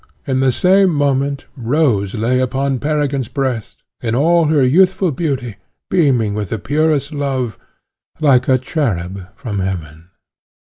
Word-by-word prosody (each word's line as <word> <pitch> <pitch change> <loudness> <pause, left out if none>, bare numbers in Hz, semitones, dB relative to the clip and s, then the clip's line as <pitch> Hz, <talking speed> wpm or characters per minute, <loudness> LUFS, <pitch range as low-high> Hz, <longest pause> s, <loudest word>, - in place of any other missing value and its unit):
in 130 -3 0
the 130 -1 +3
same 190 - +4
moment, 140 -2 0
Rose 120 -6 0
lay 120 +4 +1
upon 135 +1 -1
Peregrine's 145 -3 -1
breast, 130 -5 -3 0.2
in 115 -1 -1
all 165 +5 +3
her 150 -3 +3
youthful 185 +5 +3
beauty, 130 - -3 0.3
beaming 130 - +2
with 105 -3 -3
the 115 - -2
purest 145 +4 0
love, 135 - -2 0.6
like 135 -5 +3
a 130 - +5
cherub 100 - -3
from 115 -8 -4
Heaven. 85 -3 -5
135 Hz, 135 wpm, -17 LUFS, 115-150 Hz, 0.6 s, a